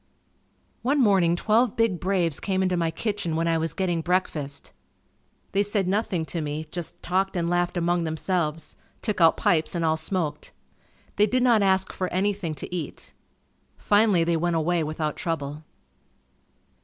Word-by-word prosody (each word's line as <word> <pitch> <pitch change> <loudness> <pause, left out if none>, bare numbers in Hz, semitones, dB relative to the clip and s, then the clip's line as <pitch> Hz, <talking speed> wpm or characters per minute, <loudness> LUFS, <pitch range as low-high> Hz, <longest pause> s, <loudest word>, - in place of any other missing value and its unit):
One 275 +5 +1
morning 190 -8 +4
twelve 220 +5 +2
big 225 -6 +1
braves 180 -5 0
came 190 -1 0
into 185 -1 +1
my 170 -2 +1
kitchen 175 -1 -2
when 165 +1 0
I 165 -1 +2
was 160 0 -2
getting 175 -3 0
breakfast. 160 -5 -2 0.8
They 195 - +2
said 205 -2 +1
nothing 190 -4 0
to 165 +1 -4
me, 150 +1 -4
just 175 -2 -6
talked 190 +2 0
and 170 -1 0
laughed 175 0 0
among 175 0 +1
themselves; 160 0 -2 0.3
took 210 -5 -1
out 165 -1 +6
pipes 160 0 +2
and 170 -1 0
all 160 0 +2
smoked. 160 -2 -3 0.6
They 210 +1 +5
did 255 +3 +1
not 235 -4 +4
ask 190 -1 +2
for 185 - -2
anything 190 -3 -1
to 165 +5 -6
eat. 160 -5 -6 0.6
Finally 205 -4 +3
they 170 0 +1
went 170 +1 0
away 165 +1 +1
without 155 0 -3
trouble. 150 -2 -3
175 Hz, 160 wpm, -25 LUFS, 160-195 Hz, 0.8 s, out